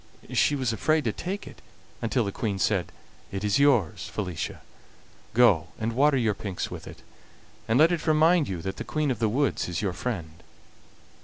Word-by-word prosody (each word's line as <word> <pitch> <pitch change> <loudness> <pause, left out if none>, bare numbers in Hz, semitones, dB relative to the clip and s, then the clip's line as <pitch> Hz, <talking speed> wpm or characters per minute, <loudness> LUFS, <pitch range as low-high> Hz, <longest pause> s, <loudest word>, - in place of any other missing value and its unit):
She 145 - +3
was 130 -5 0
afraid 155 +6 +1
to 110 - 0
take 190 - -5
it - - -12 0.4
until 115 0 +1
the 100 - -2
Queen 105 -2 -2
said: 95 -2 0 0.4
"It 95 +1 -4
is 105 +2 +2
yours, 130 - +2
Felicia; 90 -6 -4 0.7
go 110 -10 +5
and 115 +1 -2
water 140 +3 +4
your 115 -4 +2
pinks 100 -2 -5
with - - -8
it, - - -11 0.6
and 110 +1 +2
let 160 +4 +6
it 170 -1 -2
remind 160 +1 +4
you 90 -4 -4
that 95 0 -4
the - - -4
Queen 155 -3 -1
of 120 - -3
the 110 - +2
Woods 135 -3 0
is 90 +3 -3
your 95 -3 0
friend." 85 -7 -5
115 Hz, 185 wpm, -26 LUFS, 100-145 Hz, 0.7 s, let